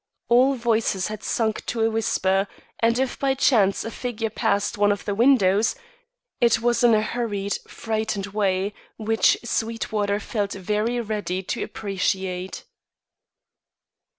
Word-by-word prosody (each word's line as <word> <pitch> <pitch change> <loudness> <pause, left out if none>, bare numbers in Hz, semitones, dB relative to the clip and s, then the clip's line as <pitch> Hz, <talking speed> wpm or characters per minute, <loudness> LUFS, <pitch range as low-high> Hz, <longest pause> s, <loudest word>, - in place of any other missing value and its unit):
All 255 +3 +5
voices 225 -6 0
had 215 -1 -6
sunk 220 +1 -1
to 230 - -2
a 225 - +3
whisper, 195 -3 +1 0.3
and 230 +1 +2
if 265 0 -1
by 270 -1 +1
chance 215 -8 +3
a 225 - -4
figure 225 -3 -3
passed 200 +1 0
one 205 0 +3
of 205 - -3
the 205 - -1
windows, 220 - +4 0.6
it 235 -1 +4
was 240 +1 +1
in 235 -2 +6
a 215 - +2
hurried, 205 -4 -2
frightened 220 -3 -2
way, 200 -1 0 0.2
which 225 0 +3
Sweetwater 220 -3 -1
felt 205 -1 -2
very 210 +5 -1
ready 205 -4 -3
to - - -3
appreciate. 190 -2 -3
215 Hz, 135 wpm, -24 LUFS, 200-230 Hz, 0.6 s, in